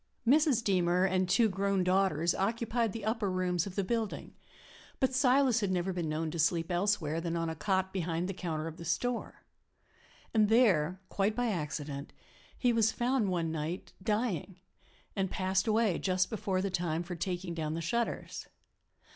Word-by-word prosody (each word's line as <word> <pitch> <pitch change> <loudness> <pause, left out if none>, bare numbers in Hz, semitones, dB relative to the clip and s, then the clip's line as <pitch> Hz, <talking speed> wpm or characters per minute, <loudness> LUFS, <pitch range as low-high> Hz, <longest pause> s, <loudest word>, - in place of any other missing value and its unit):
Mrs. 280 -3 +4
Deemer 180 -1 +2
and 185 -1 +1
two 230 +4 +4
grown 195 -1 0
daughters 180 -3 +2
occupied 230 +2 0
the 220 0 -6
upper 220 -2 0
rooms 180 -1 0
of 190 - -8
the 200 - 0
building, 225 +1 -3 0.7
but 265 -1 +2
Silas 260 -2 +4
had 200 -3 -1
never 185 0 0
been 170 -3 -2
known 155 +1 -2
to 170 - -5
sleep 165 +2 +1
elsewhere 175 -4 0
than 170 0 -2
on 165 -1 -1
a - - -5
cot 190 +2 0
behind 170 -1 -1
the 195 - -3
counter 160 -4 -3
of 165 0 -6
the 170 - -8
store. 245 +8 -2 0.9
And 215 -2 +4
there, 190 -8 +3
quite 200 +2 0
by 245 0 0
accident, 150 -4 -4 0.4
he 245 -2 +2
was 220 -1 +3
found 240 -3 +1
one 170 -3 -1
night, 160 +3 -4
dying, 205 -3 -1 0.6
and 195 -1 0
passed 190 +2 0
away 215 -4 +2
just 185 +1 +1
before 195 -4 -1
the 195 - -1
time 170 -2 -1
for 175 +1 -6
taking 175 0 -3
down 155 -1 -3
the - - -2
shutters. 235 +8 -2
190 Hz, 170 wpm, -31 LUFS, 170-220 Hz, 0.9 s, Mrs